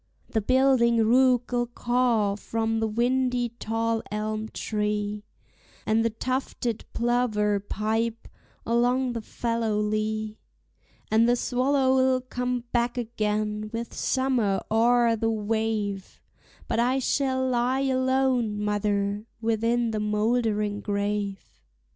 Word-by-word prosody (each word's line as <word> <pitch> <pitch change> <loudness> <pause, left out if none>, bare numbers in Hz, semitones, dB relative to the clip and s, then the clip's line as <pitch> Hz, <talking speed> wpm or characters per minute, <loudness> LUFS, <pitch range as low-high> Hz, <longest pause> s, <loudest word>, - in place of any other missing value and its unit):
The 220 - +1
building 255 0 +3
rook'll 245 0 +3
caw 240 -4 +1
from 225 +1 -2
the 225 - 0
windy 245 +2 +1
tall 225 0 -1
elm 215 +1 -3
tree, 210 -1 -2 0.6
And 220 +1 +2
the 230 - +2
tufted 245 -1 -3
plover 225 -4 +1
pipe 220 +3 -2 0.4
along 245 +2 +1
the 230 - -4
fallow 230 -1 -2
lea, 215 +1 -2 0.7
And 225 +2 +4
the 245 - +4
swallow'll 260 +1 +2
come 250 -1 -2
back 240 0 0
again 215 -2 -2
with 230 0 -5
summer 250 -7 0
o'er 235 +1 +4
the 225 +1 0
wave, 215 -2 -2 0.5
But 225 - 0
I 250 +3 +2
shall 260 0 0
lie 250 +1 +1
alone, 260 -4 +1
mother, 205 0 -1
within 230 +1 +1
the 215 - -2
moldering 210 -1 0
grave. 200 - -3
230 Hz, 110 wpm, -26 LUFS, 210-245 Hz, 0.7 s, And